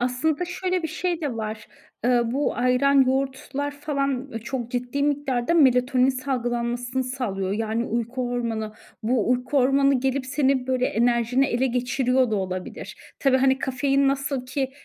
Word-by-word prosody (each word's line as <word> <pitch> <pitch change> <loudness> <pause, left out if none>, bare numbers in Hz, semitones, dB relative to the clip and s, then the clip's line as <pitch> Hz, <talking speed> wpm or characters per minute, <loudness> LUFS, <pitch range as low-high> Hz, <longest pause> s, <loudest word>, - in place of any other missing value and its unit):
Aslında 285 +7 0
şöyle 365 +1 -2
bir 320 - -2
şey 345 +1 -2
de 280 -7 -3
var. 215 -1 -5 0.4
Iıı, 240 -1 +2
bu 280 +3 0
ayran, 250 +3 +3
yoğurtlar 270 +2 -1
falan 275 -2 -2
çok 240 -1 -4
ciddi 250 +3 -2
miktarda 285 -1 0
melatonin 255 -3 +4
salgılanmasını 245 -1 -2
sağlıyor. 210 -7 -3
Yani 225 +2 -1
uyku 240 +2 -2
hormonu. 225 -3 -3 0.3
Bu 235 0 +1
uyku 250 +3 0
hormonu, 275 0 +3
gelip 265 0 -1
senin 265 -2 +1
böyle 255 -1 +1
enerjini 240 +3 +2
ele 255 0 +1
geçiriyor 250 0 +1
da 215 - +1
olabilir. 185 -1 -5 0.2
Tabii, 270 -2 +3
hani, 265 0 +3
kafein 275 +1 +1
nasıl 275 -1 -2
ki, 265 0 -2
255 Hz, 145 wpm, -24 LUFS, 240-275 Hz, 0.4 s, melatonin